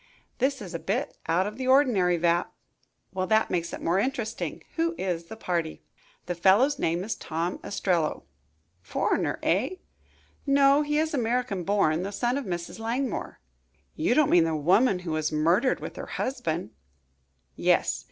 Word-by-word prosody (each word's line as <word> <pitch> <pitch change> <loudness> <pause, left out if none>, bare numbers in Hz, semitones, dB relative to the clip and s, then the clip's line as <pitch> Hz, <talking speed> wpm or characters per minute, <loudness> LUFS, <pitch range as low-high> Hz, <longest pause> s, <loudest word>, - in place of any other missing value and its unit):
"This 265 -1 0
is 185 - -8
a 170 - -3
bit 240 - -2
out 170 +3 +2
of 210 +2 -5
the 260 - -2
ordinary, 235 -10 +4
Vapp." 170 +1 +1 0.6
"Well, 185 0 -1
that 220 +2 +2
makes 170 -2 -1
it - - -7
more 175 +3 +2
interesting. 230 -1 -3
Who 335 +1 0
is 175 -3 -2
the 220 - -9
party?" 170 -6 -3 0.4
"The 175 - -2
fellow's 205 - +3
name 170 - 0
is 220 +3 -2
Tom 170 -1 -3
Ostrello." 175 -6 -1 0.6
"Foreigner, - - -1
eh?" 235 - +1 0.7
"No, 275 +1 +5
he 295 0 0
is 315 +1 0
American 235 -7 -1
born 175 -4 +2
the 195 +2 -4
son 240 +4 0
of 280 - -7
Mrs. 175 +2 -5
Langmore." 240 +3 -3 0.6
"You 200 +10 +1
don't 305 -2 +4
mean 170 -2 +6
the 160 -1 0
woman 185 - +3
who 165 - -3
was 155 0 -1
murdered 170 - +2
with - - -8
her - - -6
husband?" 170 - -3 0.8
"Yes. - - +2
195 Hz, 160 wpm, -27 LUFS, 170-255 Hz, 0.8 s, mean